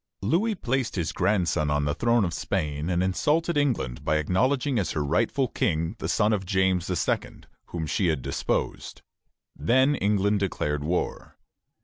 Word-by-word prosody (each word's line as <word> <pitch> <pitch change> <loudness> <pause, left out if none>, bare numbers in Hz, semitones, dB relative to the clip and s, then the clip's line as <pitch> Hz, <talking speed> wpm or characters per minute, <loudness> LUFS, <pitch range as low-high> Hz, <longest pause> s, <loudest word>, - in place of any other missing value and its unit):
Louis 190 - +1
placed 130 -6 -1
his 85 -5 -1
grandson 90 -6 +1
on 75 0 +1
the 75 - 0
throne 115 +4 +2
of 85 - -3
Spain, 75 +1 -2
and 90 0 +1
insulted 155 - +1
England 115 - 0
by 80 - +1
acknowledging 125 - +1
as 95 - -1
her 75 - -1
rightful 115 - +1
King 85 -1 -1
the - - -3
son 105 0 +2
of 100 -2 -1
James 95 -2 +1
II., 90 - -1 0.3
whom 85 -2 -4
she 90 +5 0
had 80 -6 0
deposed. - - -3 0.5
Then 130 +4 +3
England 100 -3 +1
declared 75 -6 -1
war. 85 +4 -3
95 Hz, 155 wpm, -26 LUFS, 80-120 Hz, 0.5 s, Then